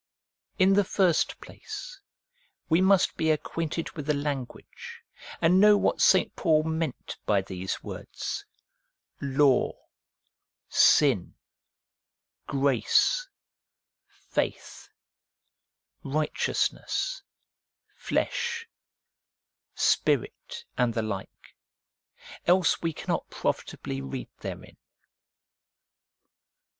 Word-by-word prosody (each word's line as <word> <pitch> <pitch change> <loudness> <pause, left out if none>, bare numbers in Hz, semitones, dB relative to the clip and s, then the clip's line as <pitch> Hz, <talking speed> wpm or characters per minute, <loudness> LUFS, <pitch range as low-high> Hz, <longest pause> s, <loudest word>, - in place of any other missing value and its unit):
In 190 0 +5
the 205 +1 +4
first 185 -3 +1
place, - - -9 0.7
we 165 +2 +4
must 190 0 +3
be 160 - +1
acquainted 160 +1 -2
with 150 -3 -7
the 150 - +2
language, 145 - -6 0.4
and 175 +3 +4
know 210 +1 +7
what - - +1
St. 190 -1 +4
Paul 155 -1 +3
meant 160 -3 -3
by 100 -2 +3
these 95 0 -5
words: - - -6 0.8
Law, 140 -1 +3 1.0
Sin, 130 - +4 1.1
Grace, 140 - +2 1.0
Faith, - - -3 1.1
Righteousness, 155 - -1 0.7
Flesh, 470 -1 -2 1.1
Spirit, 470 - 0
and 120 -2 +2
the 115 - 0
like; 100 -3 -7 0.9
else 180 -1 +3
we 165 - 0
cannot - - -3
profitably 65 - -3
read 65 0 -6
therein. - - -8
160 Hz, 80 wpm, -27 LUFS, 135-195 Hz, 1.1 s, know